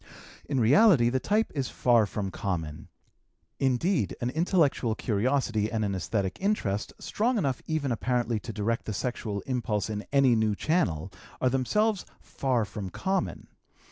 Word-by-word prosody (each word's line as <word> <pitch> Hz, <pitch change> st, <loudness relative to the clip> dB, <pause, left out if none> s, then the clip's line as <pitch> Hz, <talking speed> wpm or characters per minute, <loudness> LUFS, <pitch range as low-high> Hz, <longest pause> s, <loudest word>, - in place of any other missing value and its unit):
In 140 Hz, -3 st, +1 dB
reality 130 Hz, -, +5 dB
the 130 Hz, -, +1 dB
type 215 Hz, -, +1 dB
is 135 Hz, -4 st, -2 dB
far 120 Hz, -4 st, +3 dB
from 100 Hz, -1 st, -4 dB
common; 80 Hz, -6 st, -4 dB, 0.7 s
indeed, 135 Hz, -, +1 dB
an 120 Hz, +1 st, -1 dB
intellectual 155 Hz, -, +1 dB
curiosity 115 Hz, -1 st, 0 dB
and 110 Hz, -2 st, 0 dB
an 100 Hz, -, -1 dB
esthetic 95 Hz, +1 st, -2 dB
interest, 115 Hz, -, -1 dB
strong 235 Hz, +3 st, 0 dB
enough 135 Hz, -, -1 dB
even 155 Hz, -4 st, -1 dB
apparently 120 Hz, -1 st, 0 dB
to 115 Hz, -, -7 dB
direct 115 Hz, +2 st, -2 dB
the 110 Hz, -, -3 dB
sexual 105 Hz, -2 st, -3 dB
impulse 110 Hz, -5 st, -2 dB
in 105 Hz, 0 st, -3 dB
any 135 Hz, -3 st, +5 dB
new 110 Hz, -2 st, +1 dB
channel, 95 Hz, -, 0 dB, 0.3 s
are 130 Hz, -, +2 dB
themselves 205 Hz, -, +1 dB, 0.2 s
far 125 Hz, -5 st, -1 dB
from 100 Hz, -1 st, -6 dB
common. 190 Hz, -, -2 dB
120 Hz, 145 wpm, -28 LUFS, 105-140 Hz, 0.7 s, reality